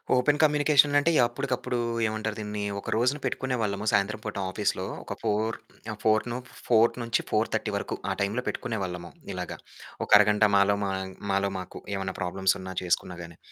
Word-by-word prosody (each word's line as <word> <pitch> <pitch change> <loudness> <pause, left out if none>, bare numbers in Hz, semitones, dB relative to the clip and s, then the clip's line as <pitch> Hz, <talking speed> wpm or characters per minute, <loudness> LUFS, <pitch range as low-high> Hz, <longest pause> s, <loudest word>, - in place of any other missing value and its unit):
Open 145 +4 +3
communication 145 -1 +4
అంటే 160 +4 +2 0.2
అప్పటికప్పుడు 125 0 -2 0.3
ఏమంటారు 110 0 -3
దీన్ని 105 -1 -4 0.2
ఒక - - -7
రోజున 125 +6 +2
పెట్టుకునేవాళ్ళము. 110 -6 -1
సాయంత్రం 100 +2 +1
పూట 110 - -4
ఆఫీస్‌లో. - - -1 0.2
ఒక - - -5
4:00 110 +2 0 0.4
ఆహ్, 110 - -6
ఫోర్ 110 0 +4
ను 120 - -2 0.3
4:00 115 -1 +5
నుంచి 115 0 +1
4:30 - - 0
వరకు. - - -2
ఆ - - +1
టైం 100 - +3 0.2
పెట్టుకునేవాళ్ళము 90 -5 -3 0.2
ఇలాగ. - - -5 0.5
ఒక - - -20
అరగంట 105 +1 +4
మాలో 100 +1 +4
మా 100 - -1 0.4
మాలో 100 0 +1
మాకు 90 - -8 0.2
ఏమన్నా 95 -1 -3
ప్రాబ్లమ్స్ 95 +1 +1
ఉన్న 95 0 -6
చేసుకున్నా 90 0 0
గాని. 85 -1 -11
110 Hz, 160 wpm, -27 LUFS, 100-120 Hz, 0.5 s, 4:00